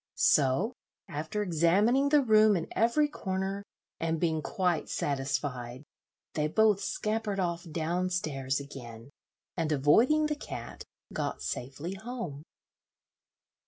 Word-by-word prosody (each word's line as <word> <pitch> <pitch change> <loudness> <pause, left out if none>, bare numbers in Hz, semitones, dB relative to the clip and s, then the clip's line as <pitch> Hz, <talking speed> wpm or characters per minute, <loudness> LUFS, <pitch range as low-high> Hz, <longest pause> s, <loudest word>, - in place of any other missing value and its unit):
So, 150 - +3 0.3
after 160 +8 -3
examining 200 - +3
the 295 -1 +5
room 215 -3 +5
in 165 - -3
every 240 +7 +3
corner, 195 -6 -3 0.4
and 165 -1 -1
being 160 -2 +1
quite 175 +2 0
satisfied, 135 -2 -2 0.5
they 150 -1 +1
both 210 +3 +3
scampered 215 0 -2
off 170 -2 -2
down 170 +3 -1
stairs 140 -7 -1
again, 120 -3 -10 0.4
and, 165 -3 -1
avoiding 225 - +4
the 300 0 0
cat, 290 - -8 0.3
got - - -3
safely 140 +8 -4
home. 195 - -6
170 Hz, 115 wpm, -30 LUFS, 145-215 Hz, 0.5 s, the